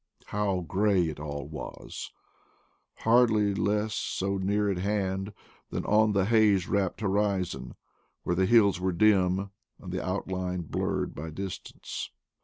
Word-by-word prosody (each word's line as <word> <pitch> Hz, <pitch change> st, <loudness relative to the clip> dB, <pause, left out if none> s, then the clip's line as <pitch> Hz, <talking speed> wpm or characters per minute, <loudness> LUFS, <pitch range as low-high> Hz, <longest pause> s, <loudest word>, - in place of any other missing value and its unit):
How 100 Hz, -3 st, -1 dB
gray 95 Hz, +1 st, +2 dB
it 75 Hz, -, -7 dB
all 75 Hz, -1 st, -5 dB
was! 75 Hz, 0 st, -7 dB, 0.9 s
hardly 110 Hz, -3 st, +4 dB
less 105 Hz, +2 st, 0 dB
so 100 Hz, 0 st, -1 dB
near 100 Hz, +2 st, +1 dB
at 95 Hz, -3 st, 0 dB
hand 95 Hz, 0 st, -1 dB, 0.4 s
than -, -, -3 dB
on 105 Hz, 0 st, +4 dB
the 100 Hz, -2 st, +2 dB
haze 105 Hz, -4 st, +4 dB
wrapped 100 Hz, 0 st, 0 dB
horizon, 100 Hz, -2 st, -1 dB, 0.5 s
where 85 Hz, -, 0 dB
the 95 Hz, +1 st, +2 dB
hills 100 Hz, -5 st, +5 dB
were 95 Hz, 0 st, 0 dB
dim 95 Hz, 0 st, +3 dB, 0.3 s
and 90 Hz, -, -8 dB
the 90 Hz, -, -2 dB
outline 90 Hz, -1 st, -2 dB
blurred 80 Hz, -, -2 dB
by 80 Hz, +2 st, -6 dB
distance. 95 Hz, +4 st, -6 dB
95 Hz, 135 wpm, -28 LUFS, 90-105 Hz, 0.9 s, hills